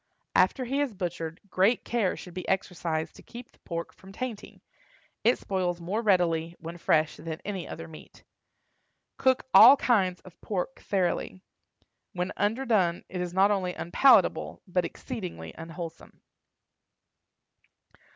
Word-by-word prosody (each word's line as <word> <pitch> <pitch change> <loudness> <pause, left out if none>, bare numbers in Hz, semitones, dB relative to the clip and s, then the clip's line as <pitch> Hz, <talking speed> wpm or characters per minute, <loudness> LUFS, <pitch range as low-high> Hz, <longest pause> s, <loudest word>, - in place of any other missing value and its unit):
After 255 - +3
he 275 +4 0
is 265 -7 -2
butchered, 165 -2 -4
great 200 +6 +2
care 225 -6 0
should 180 - -10
be 185 0 -6
exercised 165 -4 -2
to - - -13
keep 240 0 -11
the - - -29
pork 170 -1 -5
from 190 - -15
tainting; 230 0 -6 0.6
it 240 - +4
spoils 180 -3 -2
more 190 +6 -2
readily, 170 -5 +2
when 170 +1 -8
fresh, 155 -1 +2
than 160 0 -6
any 195 -3 -4
other 165 0 -7
meat. 160 -1 -14 1.0
Cook 260 -1 +2
all 280 - +10
kinds 190 -9 +2
of 185 - -16
pork 205 +6 -3
thoroughly. 185 0 -1 0.7
When 180 +1 -2
underdone 205 -5 +1
it 180 -1 -4
is 180 -1 -3
not 190 +3 +4
only 185 -3 -1
unpalatable, 220 +11 +3
but 180 -2 0
exceedingly 175 - -7
unwholesome. 165 0 -9
185 Hz, 135 wpm, -28 LUFS, 170-210 Hz, 1.0 s, all